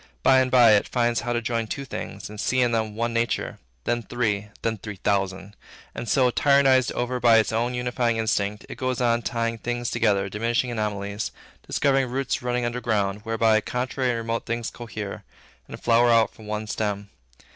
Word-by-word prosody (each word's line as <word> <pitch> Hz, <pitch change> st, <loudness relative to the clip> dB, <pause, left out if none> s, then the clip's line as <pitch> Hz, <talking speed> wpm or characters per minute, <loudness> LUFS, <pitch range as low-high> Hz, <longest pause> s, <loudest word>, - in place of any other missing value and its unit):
By 130 Hz, -, +6 dB
and 130 Hz, 0 st, +2 dB
by, 125 Hz, -3 st, +7 dB
it 105 Hz, -1 st, +4 dB
finds 120 Hz, -1 st, +1 dB
how 120 Hz, -, -3 dB
to 120 Hz, -1 st, -1 dB
join 115 Hz, 0 st, -1 dB
two 140 Hz, +5 st, -4 dB
things, 100 Hz, -6 st, -6 dB
and 105 Hz, 0 st, -10 dB
see 130 Hz, -, +1 dB
in 120 Hz, -1 st, +3 dB
them 110 Hz, -2 st, -1 dB
one 115 Hz, +1 st, -1 dB
nature; 115 Hz, -1 st, -1 dB, 0.2 s
then 120 Hz, 0 st, 0 dB
three, 105 Hz, -3 st, -1 dB, 0.2 s
then 115 Hz, -2 st, -1 dB
three 105 Hz, +1 st, -7 dB
thousand; 95 Hz, 0 st, -1 dB, 0.4 s
and 120 Hz, -, -5 dB
so, 125 Hz, +1 st, +3 dB
tyrannized 135 Hz, -2 st, +4 dB
over 125 Hz, +1 st, -2 dB
by 115 Hz, -2 st, +6 dB
its 110 Hz, -, +2 dB
own 120 Hz, +2 st, 0 dB
unifying 125 Hz, -1 st, 0 dB
instinct, 105 Hz, -2 st, -1 dB
it -, -, -9 dB
goes 130 Hz, -1 st, -1 dB
on 120 Hz, -1 st, +2 dB
tying 115 Hz, 0 st, -2 dB
things 120 Hz, +1 st, -3 dB
together, 105 Hz, -4 st, +2 dB
diminishing 115 Hz, +5 st, -1 dB
anomalies, 105 Hz, -2 st, -3 dB, 0.4 s
discovering 135 Hz, -2 st, +2 dB
roots 130 Hz, +1 st, -1 dB
running 125 Hz, 0 st, -1 dB
under 120 Hz, +1 st, -3 dB
ground, 105 Hz, -3 st, 0 dB
whereby 110 Hz, -1 st, +3 dB
contrary 125 Hz, +2 st, -2 dB
and 120 Hz, -, 0 dB
remote 115 Hz, 0 st, -3 dB
things 115 Hz, 0 st, -2 dB
cohere, 110 Hz, -4 st, -7 dB, 0.4 s
and -, -, -9 dB
flower 120 Hz, +1 st, +4 dB
out 115 Hz, -2 st, +4 dB
from 110 Hz, -, -14 dB
one 105 Hz, 0 st, -3 dB
stem. 105 Hz, -1 st, -3 dB
115 Hz, 190 wpm, -24 LUFS, 105-125 Hz, 0.4 s, by